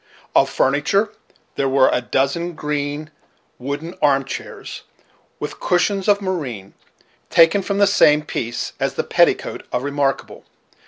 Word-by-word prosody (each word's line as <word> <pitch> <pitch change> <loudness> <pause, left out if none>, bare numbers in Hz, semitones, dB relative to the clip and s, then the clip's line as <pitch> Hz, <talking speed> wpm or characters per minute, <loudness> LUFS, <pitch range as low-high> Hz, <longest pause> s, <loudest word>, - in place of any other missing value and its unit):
Of - - +4
furniture, 155 +10 +1 0.5
there 135 - +1
were 135 0 +4
a 125 - +1
dozen 140 +8 -1
green, 150 0 -3 0.5
wooden 145 +6 -5
arm 135 -2 +3
chairs, - - -7 0.6
with - - -6
cushions 190 +2 +1
of 205 -1 +4
moreen, 130 - -4 0.6
taken 170 +4 +5
from 200 +1 -2
the 200 - +5
same 150 -6 +4
piece 120 -6 -4
as - - -1
the - - -1
petticoat - - +1
of 125 - -1
Remarkable. 140 -1 -2
150 Hz, 130 wpm, -20 LUFS, 135-180 Hz, 0.6 s, taken